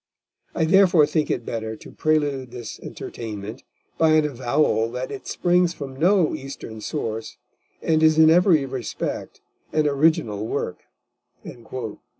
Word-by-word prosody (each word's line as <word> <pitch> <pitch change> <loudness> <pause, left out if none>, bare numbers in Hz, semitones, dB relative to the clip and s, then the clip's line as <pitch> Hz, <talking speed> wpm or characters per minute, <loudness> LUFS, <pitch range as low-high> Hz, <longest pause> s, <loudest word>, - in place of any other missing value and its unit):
I 160 - +2
therefore 180 -2 +5
think 150 0 -1
it - - -2
better 110 -1 -4
to - - -13
prelude 145 -4 0
this 120 -2 -8
Entertainment 110 -2 -7 0.4
by 160 -1 +5
an 155 -1 +4
avowal 130 -3 +1
that 125 +1 -4
it 205 - -8
springs 175 -1 +2
from 135 -2 -7
no 175 +3 +3
Eastern 125 -5 -7
source, 110 +1 -4 0.5
and 160 -1 +2
is 155 0 +5
in 160 0 +7
every 170 -4 +4
respect 130 -2 -5 0.3
an 155 -1 +2
original 140 -8 +1
Work." - - -4
145 Hz, 135 wpm, -23 LUFS, 120-160 Hz, 0.5 s, in